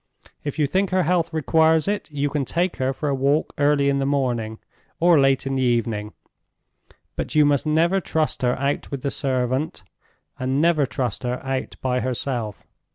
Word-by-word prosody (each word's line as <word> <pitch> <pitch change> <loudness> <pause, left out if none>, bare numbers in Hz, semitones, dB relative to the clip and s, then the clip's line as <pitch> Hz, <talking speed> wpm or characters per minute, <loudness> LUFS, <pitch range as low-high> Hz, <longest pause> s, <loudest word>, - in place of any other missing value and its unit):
If 145 0 -4
you 150 - +3
think 190 +7 0
her 185 -1 +2
health 170 0 +1
requires 160 +1 +3
it, 205 -3 -2
you 145 -1 -1
can 145 -1 0
take 170 +7 -1
her 130 0 0
for 150 +3 -4
a 140 - +1
walk 140 +3 +1
early 145 -1 +3
in 140 0 +2
the 135 - 0
morning, 120 -6 -1 0.4
or 170 -2 +5
late 135 -1 +3
in 135 - -2
the 135 - 0
evening; 115 -4 0 1.0
but - - -4
you 150 -1 +6
must 145 +1 +2
never 170 +5 +2
trust 160 -2 -1
her 125 -1 +1
out 140 +2 -1
with 140 -3 -5
the 140 - 0
servant, 130 -2 -1 0.6
and 130 +2 0
never 155 -3 +3
trust 120 0 -3
her 125 0 -2
out 135 -1 -3
by 125 -1 +1
herself. 125 -4 -3
140 Hz, 185 wpm, -23 LUFS, 130-155 Hz, 1.0 s, you